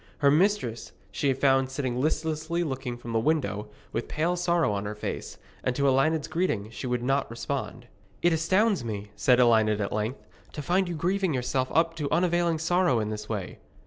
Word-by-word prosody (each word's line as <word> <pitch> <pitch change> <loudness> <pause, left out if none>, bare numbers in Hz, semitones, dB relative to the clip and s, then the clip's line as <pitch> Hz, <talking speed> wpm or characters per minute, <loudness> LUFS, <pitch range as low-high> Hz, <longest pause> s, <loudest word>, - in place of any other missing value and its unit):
Her 140 -1 +4
mistress 155 - +1 0.2
she 140 - +1
found 135 -1 +3
sitting 130 -2 -2
listlessly 160 +2 -1
looking 130 -5 -4
from 120 -1 -7
the 115 - +3
window 115 -7 0 0.2
with 115 - -3
pale 170 +3 0
sorrow 170 -8 +1
on 100 0 -3
her 105 +1 -4
face; 105 - -5 0.3
and 125 - 0
to 140 +1 +2
Elined's 140 +3 +2
greeting 115 - -1
she 115 +4 -6
would 125 0 -1 0.2
respond 120 +1 -4
not. - - -19 0.4
'It 175 -1 +4
astounds 190 - +2
me,' 105 -3 -5
said 125 +3 +3
Elined 110 -3 +4
at 100 - -2
length, 110 +5 -3 0.3
'to 150 - -5
find 180 +3 +1
you 170 - -3
giving 180 0 0
yourself 130 +1 -1
up 165 0 +2
to 145 -3 -2
unavailing 175 -1 +2
sorrow 165 -5 +2
in 105 -1 -2
this 105 0 -6
way.' 105 -5 -4
135 Hz, 185 wpm, -27 LUFS, 115-165 Hz, 0.4 s, Her